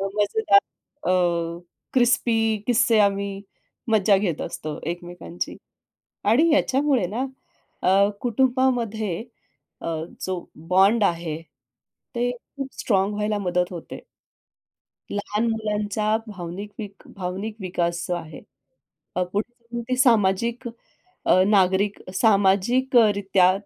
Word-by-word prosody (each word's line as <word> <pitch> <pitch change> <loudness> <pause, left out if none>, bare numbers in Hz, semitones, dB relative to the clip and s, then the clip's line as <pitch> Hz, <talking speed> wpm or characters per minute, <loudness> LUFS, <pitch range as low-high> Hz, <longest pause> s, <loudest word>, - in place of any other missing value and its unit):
मजेदार, 205 -1 +4 0.5
अ, - - +4 0.8
क्रिस्पी 235 -3 +3
किस्से 235 -2 +4
आम्ही 200 -1 +1 0.5
मज्जा 205 -2 +4
घेत 185 -6 -1
असतो 150 -1 -5
एकमेकांची. 175 - -6 0.7
आणि 265 +11 +4
याच्यामुळे 275 -6 +2
ना 240 +7 -2 0.6
अ, - - +2 0.3
कुटुंबामध्ये 240 -5 +1 0.6
अ, - - -5 0.3
जो 185 -2 -3 0.2
बॉन्ड 195 +5 +5
आहे 165 -3 -1 0.7
ते 240 +1 +1
खूप 265 +3 -8
स्ट्राँग 195 -1 +1
व्हायला 210 0 0
मदत 180 -2 +1
होते. 170 -2 -8 1.1
लहान 210 +2 -1
मुलांचा 215 0 -1
भावनिक 190 +1 -7
वीक 205 -2 -8
भावनिक 195 +3 -4
विकास 175 -2 -1
जो 180 - -1
आहे. 160 -3 -8 0.8
पुढे 190 +6 -1
जाऊन 235 0 -6
ते 255 - +1
सामाजिक 235 -1 +2 0.6
अ, 185 - +5
नागरिक 195 0 +3 0.2
सामाजिकरित्या 200 -1 +3
205 Hz, 100 wpm, -24 LUFS, 185-235 Hz, 1.1 s, बॉन्ड